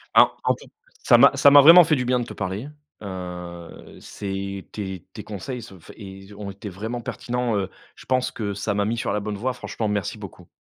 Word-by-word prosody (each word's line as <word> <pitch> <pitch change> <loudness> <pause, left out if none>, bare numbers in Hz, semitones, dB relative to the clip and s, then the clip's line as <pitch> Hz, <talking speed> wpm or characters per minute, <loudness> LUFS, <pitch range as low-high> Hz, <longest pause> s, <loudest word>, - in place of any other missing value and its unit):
Hein - - +7
en - - +2
fait, - - -16 0.3
ça - - +6
m'a - - +7
ça 140 - +6
m'a 145 - +10
vraiment 170 +5 +10
fait 160 -2 +2
du 125 - -2
bien 125 0 +2
de 120 - -3
te - - -9
parler, 95 +8 -4 0.3
heu, 90 -3 -8
c'est 100 -1 -6
tes 95 -4 -6
tes - - -8
conseils 110 +5 -6
se 100 - -12
enfin 85 - -14
é - - -15
ils 95 +1 -11
ont 100 0 -7
été 100 +2 -8
vraiment 110 +6 -5
pertinents, 120 -1 -2
heu, 95 -1 -2 0.3
je - - -15
pense 130 -1 0
que 100 -3 -4
ça 100 +1 -2
m'a 100 0 0
mis 115 +3 -1
sur 115 - -2
la 105 - 0
bonne 105 0 -4
voie, 125 +4 -2
franchement 115 -2 -4
merci 105 -3 -2
beaucoup. - - -11
105 Hz, 230 wpm, -23 LUFS, 95-120 Hz, 0.3 s, m'a